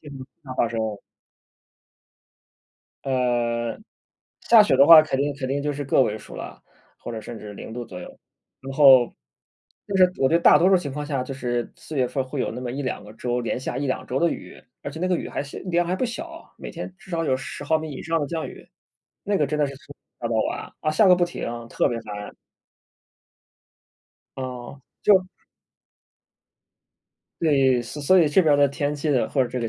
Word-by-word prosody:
经 140 -4 -10 0.2
常 130 -1 -7
发 - - +2
生。 110 -3 -3 2.1
呃， 120 -3 0 0.6
下 225 -2 +7
雪 165 - +2
的 140 +2 +6
话 165 -2 +10
肯 155 -3 -2
定 145 0 0
肯 130 -2 -4
定 140 +1 -1
就 145 0 -1
是 145 0 -5
个 135 - +3
位 110 -3 -1
数 - - -13
了， - - -9 0.4
或 - - -7
者 110 - -5
甚 115 +1 -8
至 105 -1 -9
0 110 - -9
度 120 0 -5
左 90 -4 -9
右。 - - -11 0.4
然 135 +1 -7
后 135 -5 +7 0.7
就 200 -2 -2
是， 185 - +7
我 135 - +3
觉 165 - +1
得 - - 0
大 - - +7
多 180 - +4
数 195 - +6
情 145 -7 -4
况 145 +1 -5
下 135 -4 -1
就 135 - -6
是 120 -3 -3
四 155 - -9
月 130 -2 +2
份 135 -2 -2
会 130 +1 -5
有 - - -1
那 125 - -6
么 125 -1 -4
1-2 135 -5 -4
个 105 - -12
周， 120 +2 -2
连 120 +1 -2
下 130 - -4
1-2 135 -2 -2
周 130 - -1
的 170 - +3
雨， - - -8 0.2
而 - - -5
且 150 - -9
那 180 - -1
个 180 -1 +1
雨 - - -5
还 - - -3
是 140 - -9
量 175 -2 0
还 180 - 0
不 255 - -1
小， 330 +8 -7
每 - - -7
天 - - -7
至 195 -1 -16
少 165 -1 -1
有 130 -3 +1
10 135 - -7
毫 160 +2 +1
米 155 -1 -6
以 - - -7
上 165 0 0
的 145 - -1
降 160 +1 -3
雨， - - -13 0.6
那 205 -1 +1
个 150 - +1
真 150 +1 -2
的 145 - +2
是 140 - -7
从 145 +1 -15 0.3
下 - - -2
到 115 - -2
晚， - - -6
啊， 155 - 0
下 195 +7 +4
个 180 - +8
不 175 -1 +2
停， 175 - -6 0.2
特 - - +1
别 115 -1 -3
烦。 105 -2 -8 2.0
哦， 130 +1 -7 0.2
就 190 -3 +5 2.1
对， 135 -6 +3
所 145 +5 -7
所 185 +6 +5
以 155 - +4
这 180 +6 +4
边 145 -3 +4
的 140 - +6
天 145 +1 -2
气 150 +2 -3
的 130 -4 +1
或 135 - +2
者 - - -5
这 125 - -4
个 115 - -2
140 Hz, 225 characters per minute, -24 LUFS, 125-160 Hz, 2.1 s, 话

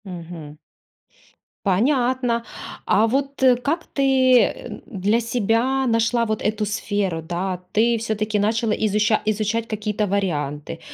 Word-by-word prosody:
Мгм. 170 -5 -9 1.1
Понятно. 245 +3 +1 0.4
А 215 - +4
вот 275 +3 -1 0.2
как 325 +6 -1
ты, 265 -2 +4
э, - - -2
м, - - -9
для 210 -1 0
себя 240 +3 +1
нашла 230 0 +2
вот 215 -1 -2
эту 215 0 -1
сферу, 205 -4 -2
да? 180 +3 -3
Ты 230 +2 +2
всё-таки 215 -1 -1
начала 220 +2 +1
изуча 215 0 +1
изучать 215 +2 -1
какие-то 210 -1 -2
варианты? 160 -6 -2
215 Hz, 120 wpm, -22 LUFS, 200-235 Hz, 1.1 s, А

